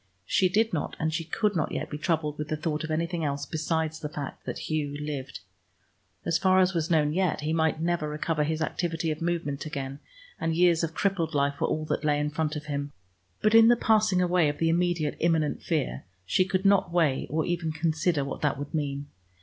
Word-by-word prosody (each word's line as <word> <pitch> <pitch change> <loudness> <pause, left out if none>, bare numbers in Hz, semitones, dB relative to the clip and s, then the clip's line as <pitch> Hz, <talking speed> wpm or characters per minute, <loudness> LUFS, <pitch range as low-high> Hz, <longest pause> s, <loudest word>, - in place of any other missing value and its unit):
She 185 - +3
did 220 +3 +2
not 155 - -2
and 160 0 0
she 165 - -1
could 205 +5 0
not 160 - 0
yet - - -4
be 150 - -4
troubled 150 -2 -1
with 150 - -3
the 155 - -2
thought 155 0 -2
of 160 - -4
anything 165 +1 -1
else 140 -1 -2
besides 160 0 -2
the 150 - -4
fact 145 -2 -7
that - - -3
Hugh 145 -2 -2
lived. 145 -2 -5 0.8
As 165 -1 +1
far 185 0 +4
as 185 0 +3
was 165 -1 -1
known 150 -3 +3
yet, 180 -3 +1
he 155 +1 -1
might 160 -1 +1
never 165 -2 0
recover 150 +1 -1
his 160 +1 -1
activity 165 -1 -1
of 155 - -5
movement 165 -4 -2
again, 135 -2 -5 0.4
and 165 0 0
years 175 -1 +4
of 165 0 -2
crippled 175 -5 0
life 140 0 0
were - - +3
all 155 0 -1
that - - -2
lay 150 -1 +2
in 150 0 -1
front 155 0 -1
of 150 0 -5
him; 145 -1 -3 0.5
but 215 - +4
in 225 0 +8
the 240 - +7
passing 215 -5 +3
away 175 -3 +3
of 145 - -4
the 165 - +1
immediate 170 -3 +1
imminent 160 -3 +1
fear, - - -1 0.2
she 185 - +2
could 190 +1 -1
not 195 -3 +4
weigh 160 -6 +2
or 155 +2 0
even 170 -2 -1
consider 160 -1 0
what 140 - -5
that 145 -2 +1
would 145 +1 -6
mean. 145 -2 -2
160 Hz, 220 wpm, -27 LUFS, 150-175 Hz, 0.8 s, in